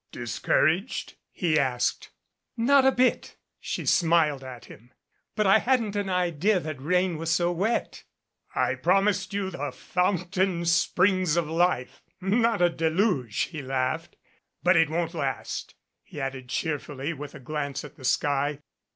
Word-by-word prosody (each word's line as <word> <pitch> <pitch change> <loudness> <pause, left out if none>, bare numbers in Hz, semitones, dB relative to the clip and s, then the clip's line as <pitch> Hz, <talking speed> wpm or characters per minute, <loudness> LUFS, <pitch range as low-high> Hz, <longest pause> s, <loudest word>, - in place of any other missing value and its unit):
"Discouraged?" 155 - 0 0.2
he 160 -5 +1
asked. 125 -3 -1 0.5
"Not 265 +4 +4
a - - +6
bit," 255 -1 +1 0.2
she - - -4
smiled 160 -5 +3
at 125 -2 -9
him. 120 +4 -15 0.4
"But 215 - +1
I 195 +3 +6
hadn't 235 -5 +1
an 205 -1 -1
idea 180 +2 +1
that 155 -5 -6
rain 180 +2 +1
was 165 0 -3
so 175 +1 +2
wet." 200 +7 -1 0.5
"I - - +1
promised 195 +1 +1
you 200 -1 -2
the 145 -4 -4
fountain 180 +3 -1
springs 180 0 +2
of 170 -3 +1
life 165 -5 0 0.2
not 215 +1 +2
a 175 - +5
deluge," 160 - 0
he 155 -3 -5
laughed. 130 -1 -2 0.5
"But 180 +1 +5
it 165 -2 +4
won't 165 +1 -2
last," 140 -5 -4 0.3
he - - -10
added 135 -2 -5
cheerfully 145 0 -3
with 145 -1 -8
a - - -9
glance 140 +1 -4
at 145 - -12
the - - -15
sky. 145 +2 +1
170 Hz, 145 wpm, -26 LUFS, 145-190 Hz, 0.5 s, a